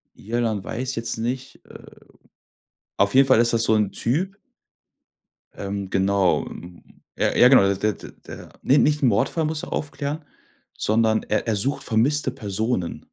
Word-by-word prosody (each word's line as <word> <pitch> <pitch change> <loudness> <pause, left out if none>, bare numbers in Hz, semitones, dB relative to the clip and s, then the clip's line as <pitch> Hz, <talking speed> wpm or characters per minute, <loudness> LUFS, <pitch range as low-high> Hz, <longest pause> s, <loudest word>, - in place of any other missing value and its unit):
Irland 110 -2 -2
weiß 125 +5 -4
jetzt 115 0 -3
nicht, 125 +3 -4
äh - - -15 0.9
Auf 100 +4 +2
jeden 135 0 +6
Fall 130 -3 +5
ist 120 0 +2
das 115 0 +2
so 110 - +3
'n 105 -2 +1
Typ 175 - -2 1.2
Ähm, 100 -1 -5
genau. 95 -1 +1 0.7
Ja, - - 0
ja, 125 - +7
genau. 130 -6 +6
Der 105 +2 -1
der - - -12 0.2
der - - -10
ne, 140 - +3
nicht 150 0 +2
'n 130 - +4
Mordfall 120 +9 +1
muss 155 0 -3
er - - -6
aufklären, 145 +1 -4 0.5
sondern 110 0 +1
er - - -2
er 110 - +1
sucht 135 +8 -1
vermisste 135 +7 +1
Personen. 105 -2 -3
115 Hz, 155 wpm, -23 LUFS, 105-135 Hz, 1.2 s, ja